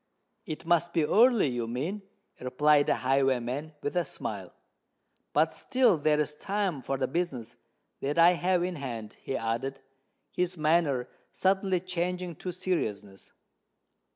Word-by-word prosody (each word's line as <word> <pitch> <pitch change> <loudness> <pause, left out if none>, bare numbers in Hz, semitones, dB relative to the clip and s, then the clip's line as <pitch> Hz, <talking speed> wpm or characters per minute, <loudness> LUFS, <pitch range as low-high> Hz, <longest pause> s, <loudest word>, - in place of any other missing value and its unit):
"It 155 +1 -6
must 170 0 +2
be 160 - +2
early, 230 - +5
you 120 -2 -2
mean," 150 - -3 0.4
replied 145 +3 +3
the - - +3
highwayman, 135 +3 0
with 145 - -2
a 175 - +2
smile. 100 - -6 0.8
"But 160 +2 +2
still 250 - +2
there 150 0 +2
is 150 0 0
time 195 -3 -2
for 135 +2 -2
the 130 -1 0
business 130 -7 -3 0.4
that 145 +3 -2
I 170 +1 +8
have 180 0 +1
in 180 -1 -3
hand," 115 -6 -6
he 135 - -3
added, 115 +4 -3 0.5
his 180 0 -1
manner 155 -5 +2 0.2
suddenly 190 -1 +1
changing 180 -1 -3
to 180 - -4
seriousness. 105 - -3
150 Hz, 140 wpm, -29 LUFS, 130-180 Hz, 0.8 s, I